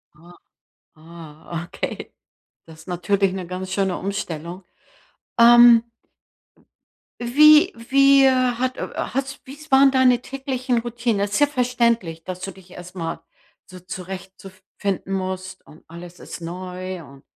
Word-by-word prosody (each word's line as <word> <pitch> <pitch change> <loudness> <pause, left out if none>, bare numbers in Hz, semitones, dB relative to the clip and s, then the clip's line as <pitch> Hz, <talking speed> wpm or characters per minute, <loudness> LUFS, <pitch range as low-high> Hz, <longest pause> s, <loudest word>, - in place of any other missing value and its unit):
Ah, 170 +3 -18 0.6
ah, 160 +1 -9
okay. - - -6 0.5
Das 160 -1 -14
ist 165 - -17
natürlich 195 +2 0
'ne 185 -2 -5
ganz 185 +1 -6
schöne 190 -2 0
Umstellung. 180 -2 -5 0.8
Ähm 240 0 +8 1.4
wie 300 +5 +6
wie, 275 +3 +4
äh, 265 - +6
hat, 255 0 0
äh, - - -4
hat's 270 +1 -4
wie's 295 +3 -13
waren 270 0 +6
deine 255 -2 +3
täglichen 260 -2 -3
Routinen? 235 -2 -2
Das 200 0 -1
ist 205 - 0
ja 290 - +5
verständlich, 235 - 0
dass 185 -1 -7
du 195 +1 -6
dich 185 -1 -18
erstmal 175 -2 -7 0.5
so 185 -1 -13
zurecht 185 +1 -8
zu 195 - -11 0.3
finden 195 -1 -3
musst 185 0 -5
und 155 - -17
alles 175 +1 -11
ist - - -9
neu 180 +1 -7
und 140 -1 -16
195 Hz, 140 wpm, -22 LUFS, 180-250 Hz, 1.4 s, Ähm